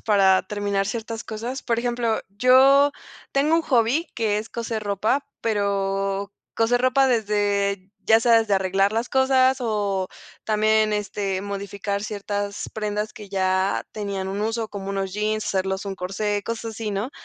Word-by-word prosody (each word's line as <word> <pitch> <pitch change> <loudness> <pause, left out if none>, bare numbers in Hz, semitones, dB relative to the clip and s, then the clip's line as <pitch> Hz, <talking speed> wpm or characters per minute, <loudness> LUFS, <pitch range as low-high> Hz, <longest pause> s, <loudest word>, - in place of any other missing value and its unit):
para 195 -3 +4
terminar 200 0 -1
ciertas 225 +1 -4
cosas. 235 +5 -5
Por 230 -2 0
ejemplo, 235 -2 0
yo 265 +6 +5 0.4
tengo 290 +4 +3
un 330 - +4
hobby 260 +4 +2
que 215 -3 0
es 215 +2 -6
coser 230 -2 -4
ropa, 210 +7 0 0.2
pero 195 -2 -1 0.2
coser 235 +2 +2
ropa 255 +2 +4
desde 205 -4 0 0.2
ya 225 - +6
sea 230 0 +5
desde 220 -3 +1
arreglar 195 +1 +2
las 230 +2 -1
cosas 265 0 +3
o 205 -5 -1 0.4
también 215 0 +2
este 200 -2 -2
modificar 200 0 -4
ciertas 205 -1 -4
prendas 210 0 -3
que 210 -4 -11
ya 190 0 0
tenían 200 -2 -4
un 195 +2 -3
uso, 225 +1 -1
como 195 -1 -6
unos 195 -1 -2
jeans, 215 +1 -1
hacerlos 190 0 -1
un 195 -1 -4
corsé, 205 +3 -2
cosas 230 0 -3
así, 220 0 -4
¿no? 205 +6 -2
210 Hz, 155 wpm, -23 LUFS, 200-230 Hz, 0.4 s, ya